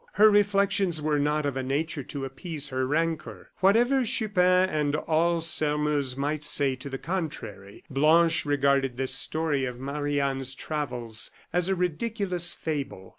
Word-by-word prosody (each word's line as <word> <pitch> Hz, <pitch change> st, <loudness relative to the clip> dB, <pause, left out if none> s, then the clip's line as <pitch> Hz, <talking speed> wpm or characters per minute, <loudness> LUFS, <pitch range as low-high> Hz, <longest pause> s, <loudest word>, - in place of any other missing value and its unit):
Her 215 Hz, +2 st, +6 dB
reflections 200 Hz, -4 st, +2 dB
were 150 Hz, -1 st, 0 dB
not 150 Hz, +1 st, 0 dB
of 140 Hz, -2 st, -2 dB
a 135 Hz, -, -2 dB
nature 145 Hz, +4 st, -2 dB
to 135 Hz, +1 st, -6 dB
appease 150 Hz, +2 st, -5 dB
her 130 Hz, -1 st, -1 dB
rancor. 160 Hz, +2 st, -2 dB
Whatever 240 Hz, +8 st, +3 dB
Chupin 185 Hz, -5 st, +2 dB
and 150 Hz, -4 st, -1 dB
all 165 Hz, +2 st, +1 dB
Sairmeuse 150 Hz, -4 st, +1 dB
might 145 Hz, +2 st, -2 dB
say 140 Hz, -3 st, +2 dB
to 135 Hz, +2 st, -8 dB
the 135 Hz, -, -4 dB
contrary, 130 Hz, -, -6 dB
Blanche 160 Hz, +4 st, +3 dB
regarded 140 Hz, -3 st, +1 dB
this 130 Hz, 0 st, 0 dB
story 150 Hz, 0 st, +1 dB
of 125 Hz, -1 st, -6 dB
Marie 145 Hz, +2 st, -2 dB
Anne's 135 Hz, -1 st, -2 dB
travels 125 Hz, -7 st, -3 dB, 0.2 s
as 175 Hz, +1 st, +1 dB
a 190 Hz, -, +2 dB
ridiculous 180 Hz, 0 st, -1 dB
fable. 140 Hz, -, -5 dB
150 Hz, 150 wpm, -26 LUFS, 135-175 Hz, 0.2 s, Her